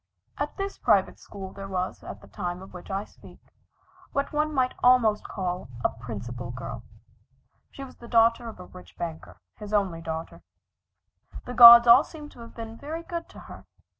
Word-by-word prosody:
At - - -4
this 395 0 -5
private - - +2
school, 190 -2 -10
there 195 0 -8
was, 185 -1 -4
at - - -9
the - - -15
time 180 -2 -5
of 190 - -14
which 180 - -11
I 195 +1 -3
speak, - - -17 0.7
what 280 +1 -2
one 305 +1 0
might 260 -3 0
almost 240 -4 +4
call 180 -6 -4 0.2
a - - +4
"principal 120 +1 -7
girl." 125 +1 -7 0.9
She 275 - -10
was 270 - -12
the 235 - -13
daughter 230 0 +3
of 220 - -12
a 180 - -9
rich 180 0 -15
banker 165 -2 -7 0.2
his 210 -1 -9
only 190 -5 0
daughter. 160 0 -6 1.0
The 245 - -6
gods 235 0 +11
all 240 +5 +8
seemed 300 -2 -11
to - - -17
have 230 0 -12
been 225 0 -8
very 315 +5 -6
good 340 -1 -6
to - - -13
her. - - -13
215 Hz, 185 wpm, -26 LUFS, 180-250 Hz, 1.0 s, gods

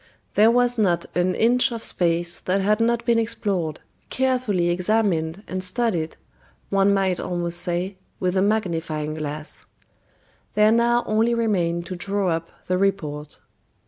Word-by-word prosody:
There 215 +2 +5
was 245 0 +2
not 180 -5 +2
an 180 +1 +1
inch 245 +3 +3
of 230 -1 -5
space 170 0 +1
that 185 +2 0
had 210 +2 +2
not 235 +1 +1
been 235 -1 +3
explored, 195 -8 -2 0.3
carefully 250 -10 +1
examined 185 -2 0
and 185 0 -3
studied, 185 -5 0 0.5
one 195 0 +3
might 190 -2 +1
almost 175 -1 -2
say, 180 +2 -2 0.2
with 180 0 0
a 190 - +3
magnifying 165 -7 -1
glass. 155 0 -6 0.9
There 210 +1 +5
now 235 +1 +3
only 225 +2 +2
remained 175 -7 0
to 185 - -6
draw 195 +1 -1
up 165 0 -3 0.2
the 185 0 0
report. 155 -7 -2
190 Hz, 145 wpm, -23 LUFS, 170-220 Hz, 0.9 s, There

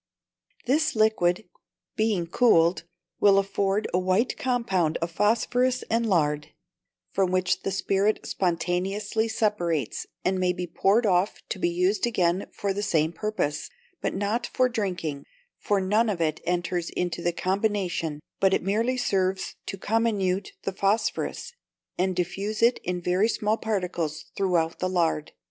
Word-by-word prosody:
This 310 +3 +2
liquid, 215 -3 +2 0.5
being 215 -5 +1
cooled, 170 -4 +3 0.3
will 200 -1 +6
afford 195 +1 +1
a 180 - +3
white 185 +6 +1
compound 195 -11 0
of 170 0 -3
phosphorus 245 +6 +1
and 230 0 +1
lard, 150 -4 +1 0.6
from 190 -2 +1
which 185 0 +1
the - - -2
spirit 195 +2 0
spontaneously 190 +5 -1
separates, 175 - -1 0.2
and 185 0 +1
may 180 -1 +2
be 180 0 -4
poured 200 +6 +2
off 185 0 +1
to - - -3
be 175 - +1
used 185 +5 +1
again 180 -4 +1
for 200 -1 -2
the 205 - -3
same 160 -5 +1
purpose, 210 -8 -2 0.3
but - - -2
not 210 +5 -1
for 255 - +2
drinking, 180 - -3 0.4
for 205 -1 +1
none 210 +4 +2
of 195 -5 -2
it 155 -2 0
enters 175 -1 -1
into 175 -1 -2
the 175 - +1
combination, 185 -5 -1 0.2
but 195 0 +4
it - - -2
merely 225 +7 +1
serves 190 -5 0
to 195 - -4
comminute 200 -3 0
the - - -1
phosphorus, 215 - -1 0.5
and 185 0 +1
diffuse 195 +5 -2
it 240 +2 +4
in 180 0 -2
very 185 +6 +2
small 215 -1 +1
particles 180 -8 -3
through 180 -4 +2
the 185 - 0
lard. 165 -4 0
190 Hz, 145 wpm, -26 LUFS, 175-215 Hz, 0.6 s, will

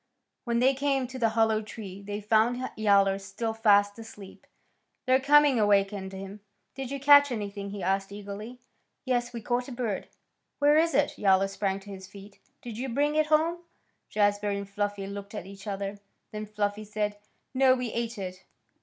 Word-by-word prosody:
When 235 -1 0
they 260 +3 +4
came 270 -1 0
to 255 +1 -8
the 230 -2 +3
hollow 220 -1 +3
tree 205 -3 -9
they 205 +1 -5
found 230 +4 +1
Yowler 200 -2 +3
still 200 +3 -4
fast 205 -1 +3
asleep. 210 -4 -12 0.6
Their 255 +1 +4
coming 285 -2 +5
awakened 200 -2 +2
him. 195 +1 -8 0.3
"Did 270 -1 -6
you 280 0 -4
catch 285 0 +7
anything?" 200 -3 -4
he 200 -2 -6
asked 195 +1 0
eagerly. 205 +4 -8 0.5
"Yes, 245 -2 0
we 235 -1 -6
caught 245 +2 -1
a - - -8
bird." 235 -5 -3 0.5
"Where 290 +1 +4
is 325 -1 +3
it?" 290 +1 +1
Yowler 195 -1 +4
sprang 195 0 -2
to 200 +1 -11
his 190 -1 -9
feet. 200 0 -14 0.2
"Did 235 -2 -7
you 265 +1 -3
bring 290 +5 +1
it 310 0 +2
home?" 320 +3 +2 0.5
Jazbury 205 -1 +1
and 200 0 -6
Fluffy 205 0 -3
looked 200 +1 -7
at - - -5
each 200 +2 -11
other. 200 0 -4 0.3
Then 215 0 -6
Fluffy 210 0 -2
said, 210 0 -3 0.3
"No; 260 0 +5
we 250 -3 -3
ate 235 0 -3
it." 185 -1 -6
210 Hz, 180 wpm, -28 LUFS, 200-250 Hz, 0.6 s, catch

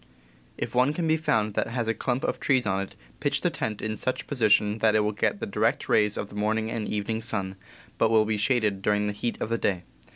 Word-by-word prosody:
If - - -4
one 130 +4 +3
can 170 -1 -1
be 160 - +4
found 110 -9 0
that - - 0
has 115 0 -2
a 115 - +2
clump 125 +2 -2
of - - -1
trees 130 -4 +2
on 95 -1 0
it, 100 - -7 0.2
pitch - - 0
the - - +1
tent 105 -2 -4
in 110 0 -2
such 130 - -3
position 110 -4 +2
that 110 -1 +3
it 110 - +4
will 105 0 +1
get 105 - 0
the - - -3
direct - - 0
rays 105 -1 +3
of 105 - -4
the - - -12
morning 110 +2 0
and 110 -2 -3
the - - -3
evening 110 +2 -2
sun, 95 -4 -3 0.4
but 115 - +4
will 110 -1 +4
be 110 0 0
shaded 105 -3 +1
during 105 +1 +1
the 105 - -1
heat 115 +3 -3
of - - -3
the 115 0 0
day. 90 -3 0
110 Hz, 255 wpm, -26 LUFS, 105-115 Hz, 0.4 s, be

